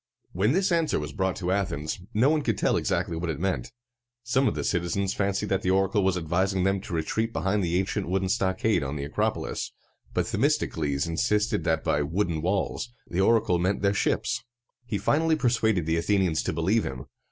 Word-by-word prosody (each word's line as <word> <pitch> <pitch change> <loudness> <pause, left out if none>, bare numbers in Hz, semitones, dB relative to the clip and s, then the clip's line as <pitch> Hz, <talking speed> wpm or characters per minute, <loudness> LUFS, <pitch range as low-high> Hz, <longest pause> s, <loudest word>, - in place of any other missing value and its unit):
When 100 +8 +2
this 190 +1 +2
answer 165 -2 +2
was 75 +1 -5
brought 95 -2 0
to 90 0 -2
Athens, 80 -6 -1
no 125 +7 +3
one 155 -1 +2
could 115 -7 -1
tell - - +2
exactly 85 - 0
what 85 +1 -3
it 75 -3 -3
meant. 95 +5 -2 0.5
Some 130 +3 +2
of - - 0
the - - -2
citizens 90 +2 0
fancied 100 0 -1
that 95 -1 +1
the 90 - -1
oracle 95 +1 +2
was 95 -1 +2
advising 95 +3 0
them 95 0 +1
to 95 -3 -5
retreat 110 +8 -1
behind 100 -1 0
the 85 0 +1
ancient 95 0 -1
wooden 95 +1 0
stockade 95 -1 +1
on 70 +1 -3
the 70 - -4
Acropolis, 70 - -2 0.4
but - - 0
Themistocles 70 -3 0
insisted 105 +5 0
that 80 -1 +1
by 75 - +1
"wooden 85 +1 -1
walls" 95 +6 -1 0.2
the 90 +2 -1
oracle 100 -4 +3
meant 95 +3 0
their 100 0 +3
ships. - - 0 0.4
He 105 - -1
finally 155 - +2
persuaded 115 - +1
the 80 +1 +1
Athenians 90 -2 +1
to - - 0
believe 95 +7 +1
him. - - -5
95 Hz, 195 wpm, -26 LUFS, 85-105 Hz, 0.5 s, no